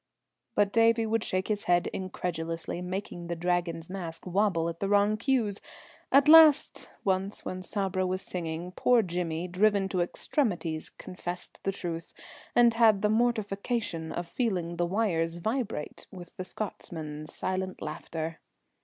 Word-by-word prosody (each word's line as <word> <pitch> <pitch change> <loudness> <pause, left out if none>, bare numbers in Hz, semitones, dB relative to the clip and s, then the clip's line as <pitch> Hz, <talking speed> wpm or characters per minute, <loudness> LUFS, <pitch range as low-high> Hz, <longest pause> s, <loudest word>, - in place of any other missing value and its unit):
But 205 -1 +3
Davie 230 0 +4
would 225 0 0
shake 185 0 -1
his 210 -1 -1
head 175 0 +3
incredulously, 170 -2 -4
making 180 -1 -5
the 170 - -2
Dragon's 170 -1 -1
mask 175 -3 -6
wobble 185 -3 +1
at 170 0 -5
the 195 - -1
wrong 205 +1 +4
cues. 225 -3 0 0.5
At 280 +1 +6
last, 310 -2 +7
once 190 +1 -1
when 185 0 -4
Sabra 190 -1 -1
was 185 +1 -2
singing, 170 0 -4
poor 235 +5 +3
Jimmy, 175 -1 -2
driven 195 +2 +2
to 185 -2 0
extremities, 175 - -1
confessed 175 0 -6
the 195 - 0
truth, 170 -3 -5 0.4
and 240 -1 +6
had 220 -3 +4
the 210 - +4
mortification 215 -6 0
of 175 0 -4
feeling 175 -6 -1
the 175 0 +1
wires 170 -5 0
vibrate 215 - -3
with 175 -3 -11
the 185 - -5
Scotchman's 155 -7 -6
silent 185 0 -2
laughter. 160 +1 -5
185 Hz, 145 wpm, -29 LUFS, 170-210 Hz, 0.5 s, last